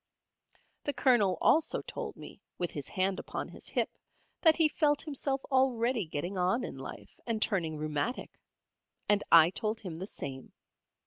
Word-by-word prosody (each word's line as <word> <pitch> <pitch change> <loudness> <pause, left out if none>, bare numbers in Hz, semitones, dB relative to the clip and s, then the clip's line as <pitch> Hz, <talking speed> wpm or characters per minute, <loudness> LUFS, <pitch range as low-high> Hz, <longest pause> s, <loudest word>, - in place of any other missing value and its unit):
The 290 - 0
Colonel 215 - +3
also 320 0 +3
told - - -6
me - - -11 0.2
with 175 - -2
his 145 -2 -5
hand 190 0 0
upon - - -5
his - - -7
hip - - -2 0.4
that 320 -3 +6
he 325 -2 +5
felt 295 -1 +1
himself 275 -2 -1
already 245 -5 +2
getting 175 +5 -3
on 185 +8 +1
in - - -6
life, - - -10
and 230 -2 0
turning 170 -8 0
rheumatic. 155 - -3 0.7
And 205 -1 +3
I 165 0 +8
told 215 +3 -2
him 170 -6 -6
the 190 - -4
same. 130 -9 -6
210 Hz, 155 wpm, -31 LUFS, 175-260 Hz, 0.7 s, I